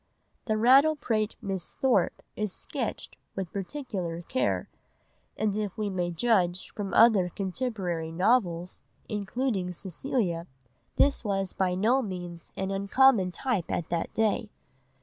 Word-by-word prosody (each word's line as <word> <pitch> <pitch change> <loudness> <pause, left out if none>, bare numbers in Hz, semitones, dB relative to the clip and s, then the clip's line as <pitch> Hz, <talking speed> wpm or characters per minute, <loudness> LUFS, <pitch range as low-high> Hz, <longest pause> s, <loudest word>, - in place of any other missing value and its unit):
The 215 -2 +1
rattle 270 +7 +6
pate 215 -6 -1
Miss 190 -3 -3
Thorpe 265 -2 +1
is 210 -2 -2
sketched - - -4 0.2
with 190 -3 -4
particular 195 - -4
care, 260 +9 0 0.7
and 210 -2 0
if 210 -3 -3
we 210 -2 -1
may 180 -2 -1
judge 180 -1 +1
from 200 -2 -4
other 215 -6 +6
contemporary 185 -4 -3
novels, 180 -2 +1 0.3
including 205 -2 -1
Cecilia, 180 - -2 0.5
this 280 -2 +3
was 195 -3 -1
by 185 -1 0
no 230 +8 +3
means 175 -5 -6
an 190 0 -2
uncommon 200 0 +4
type 215 -4 -1
at 170 - -2
that 170 -1 -1
day. 220 0 +1
195 Hz, 130 wpm, -28 LUFS, 180-230 Hz, 0.7 s, rattle